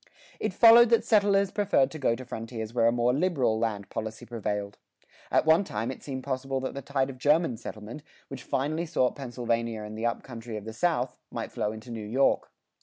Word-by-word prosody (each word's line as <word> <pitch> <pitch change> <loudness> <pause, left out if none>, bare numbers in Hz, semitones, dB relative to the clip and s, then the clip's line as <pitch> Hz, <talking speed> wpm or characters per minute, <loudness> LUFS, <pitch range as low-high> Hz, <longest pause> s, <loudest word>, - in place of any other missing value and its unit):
It - - -1
followed 235 0 +8
that 230 - +3
settlers 200 -2 +3
preferred 200 -10 +2
to 155 - -7
go 115 -4 +2
to 130 - -9
frontiers 115 -1 -6
where 115 -2 +3
a - - +5
more 120 +1 +2
liberal 135 -8 +1
land 105 -3 -2
policy 110 0 -5
prevailed. 105 -3 -4 0.5
At - - +2
one 160 +4 +5
time 115 - -3
it - - -9
seemed 130 -2 -6
possible 135 0 -2
that 130 - -3
the 140 - -5
tide 135 0 -1
of 130 - -13
German 150 -1 +3
settlement, 110 +5 -8 0.3
which 135 -2 -8
finally 155 +7 -1
sought 130 -6 +1
Pennsylvania 115 -4 -2
and 105 0 -7
the 115 +2 -1
up 115 - -3
country 115 -3 -7
of 105 - -8
the 110 - -6
South, 130 -1 0
might - - -5
flow 105 - -2
into 110 +3 -9
New 115 -2 -5
York. 130 +5 +2
125 Hz, 205 wpm, -28 LUFS, 115-145 Hz, 0.5 s, followed